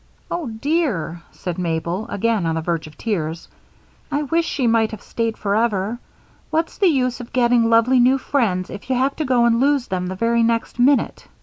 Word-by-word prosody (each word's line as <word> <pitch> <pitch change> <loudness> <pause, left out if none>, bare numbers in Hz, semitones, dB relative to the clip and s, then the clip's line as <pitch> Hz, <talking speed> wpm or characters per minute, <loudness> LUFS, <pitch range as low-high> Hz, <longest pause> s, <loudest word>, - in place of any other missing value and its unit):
"Oh, 340 -4 -2
dear," 225 - -1
said 180 -1 -5
Mabel, 170 +3 -2
again 215 -3 0
on 160 - 0
the 160 - -1
verge 165 -1 -2
of 155 - -15
tears, 165 -7 -3 0.6
"I 290 +1 0
wish 330 +4 +1
she 260 - -1
might 225 -1 +3
have 220 - -8
stayed 230 -1 -2
forever. 210 +1 0 0.5
What's 325 +1 -1
the 395 - +4
use 255 -5 +1
of 245 -1 -9
getting 240 -2 +3
lovely 230 +3 +4
new 255 +2 +5
friends 210 -10 -1
if 205 +5 -9
you 260 - +2
have 265 +2 +1
to 310 - -1
go 250 -2 +3
and 235 0 +3
lose 275 -1 +2
them 180 -1 -2
the 185 - -4
very 230 +3 +1
next 230 +1 0
minute? 270 +3 +2
230 Hz, 195 wpm, -21 LUFS, 190-260 Hz, 0.6 s, new